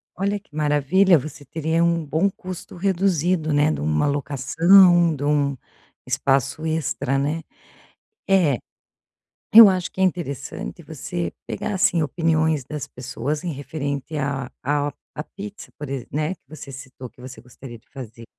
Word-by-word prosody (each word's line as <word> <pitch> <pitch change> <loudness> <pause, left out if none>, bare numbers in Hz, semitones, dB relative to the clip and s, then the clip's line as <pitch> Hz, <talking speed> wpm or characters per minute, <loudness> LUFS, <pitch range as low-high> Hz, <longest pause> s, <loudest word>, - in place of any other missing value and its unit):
Olha 200 +2 -1
que 195 -7 -22
maravilha, 155 +5 +4
você 145 +1 -7
teria 160 +4 0
um 170 -1 +1
bom 160 +7 +1
custo 185 -2 -9
reduzido, 180 -3 +1
né, 145 +1 +3
de - - -3
uma 75 0 +1
locação, 165 +5 +4
de 145 - -6
um 145 -2 +1 0.5
espaço 135 +2 0
extra, 155 -4 -1
né, 150 +4 -1 0.9
é, 175 -10 +3 1.0
eu 225 -1 +12
acho 185 -2 -1
que - - -7
é - - +5
interessante 170 -8 -3
você 85 -1 -4 0.2
pegar 210 - -3
assim 190 -4 +2
opiniões 160 -1 +1
das 150 +1 -5
pessoas 140 +4 -4
em 175 - -2
referente 140 +1 -4
a 135 -2 -2
a 145 +1 +1 0.2
a 150 - -4
pizza 205 +4 -10
por 150 -2 -6
exem 135 -3 -5
né, 155 +4 -1
que - - -32
você 145 -2 -10
citou 130 -1 -10
que - - -21
você 125 -3 -10
gostaria 125 -1 -11
de 110 - -31
fazer. 115 -4 -10
150 Hz, 155 wpm, -22 LUFS, 135-175 Hz, 1.0 s, eu